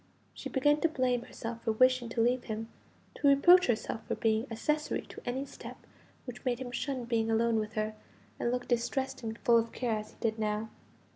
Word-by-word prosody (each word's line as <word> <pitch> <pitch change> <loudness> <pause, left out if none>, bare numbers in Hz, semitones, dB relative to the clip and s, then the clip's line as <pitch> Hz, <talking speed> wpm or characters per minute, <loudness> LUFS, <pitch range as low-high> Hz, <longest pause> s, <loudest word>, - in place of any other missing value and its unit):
She - - -7
began 290 +3 +2
to 330 - +3
blame 255 -5 +1
herself 230 0 -6
for 225 - +1
wishing 255 +1 +3
to 230 0 -1
leave 245 +2 +2
him, 220 0 -4 0.4
to 285 - 0
reproach 350 +7 +7
herself 225 -1 -1
for - - -1
being 220 +2 +1
accessory 300 +7 -1
to - - -11
any 260 +3 -2
step - - -10 0.5
which 245 -2 -8
made 250 -2 0
him 250 -1 -6
shun 255 0 -3
being 225 -2 0
alone 225 0 +2
with 215 0 -4
her, 215 0 -1 0.5
and - - 0
look 245 0 -2
distressed 265 +3 -1
and 225 -1 -5
full 235 -1 +4
of 230 0 -3
care 240 -3 -1
as 210 - -8
he - - -19
did 225 -1 -1
now. 215 +1 -1
240 Hz, 205 wpm, -31 LUFS, 225-260 Hz, 0.5 s, reproach